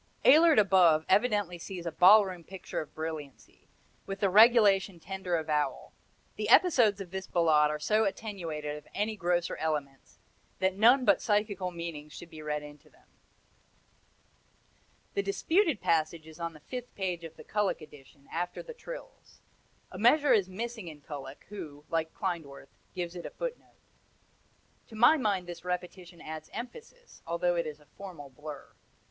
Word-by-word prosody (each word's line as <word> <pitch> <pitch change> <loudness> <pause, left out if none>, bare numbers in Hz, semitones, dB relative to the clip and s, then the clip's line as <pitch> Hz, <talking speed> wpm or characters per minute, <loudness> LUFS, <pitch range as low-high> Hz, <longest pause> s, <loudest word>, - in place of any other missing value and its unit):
Ehlert 315 +3 +7
above 180 -6 +5
evidently 205 -6 +2
sees 175 0 -7
a 170 - -2
ballroom 185 0 +5
picture 190 +2 -6
of 155 - -11
brilliancy, 155 -4 -7 0.4
with 195 0 -5
the 195 -2 +1
regulation 205 -4 +5
tender 190 0 -3
avowal. 155 -2 -2 0.4
The - - -2
episodes 240 - +5
of 185 -3 -8
this 190 0 -5
Ballade 155 -3 +3
are 150 - -2
so 215 +9 +2
attenuated 165 -8 -4
of 150 - -13
any 215 +2 -1
grosser 175 -2 -1
elements 145 -4 -4 0.4
that 190 0 +1
none 245 +6 +5
but 200 - +4
psychical 205 -3 0
meanings 170 -4 -7
should 175 - -11
be 155 -1 -10
read 150 -1 -3
into 150 0 -13
them. - - -26 2.1
The 400 - +1
disputed 370 - +1
passage 160 0 0
is 160 +1 -13
on 170 -1 -4
the 155 - -15
fifth 245 - -8
page 180 -3 -3
of 165 -1 -9
the - - -12
Kullak 210 -2 -1
edition, 140 -2 -16
after 175 +1 -3
the 480 - -9
trills. - - -11 0.5
A 185 - -8
measure 285 +6 +5
is 195 -4 +2
missing 220 0 -5
in 155 -3 -10
Kullak, 145 -1 -9
who, 150 -8 -9
like 160 -1 -1
Klindworth, 160 -8 -5 0.2
gives 175 -1 -4
it - - -5
in - - -6
a - - -7
footnote. - - -7 1.1
To 225 - -12
my 240 +8 +6
mind 200 -8 0
this 175 -1 -9
repetition 180 -1 -5
adds 155 0 -8
emphasis, 470 - -10
although 175 +1 0
it 170 -2 -1
is 150 -1 -7
a 150 - -21
formal 145 -3 -11
blur. 150 +2 -10
180 Hz, 160 wpm, -30 LUFS, 155-210 Hz, 2.1 s, Ehlert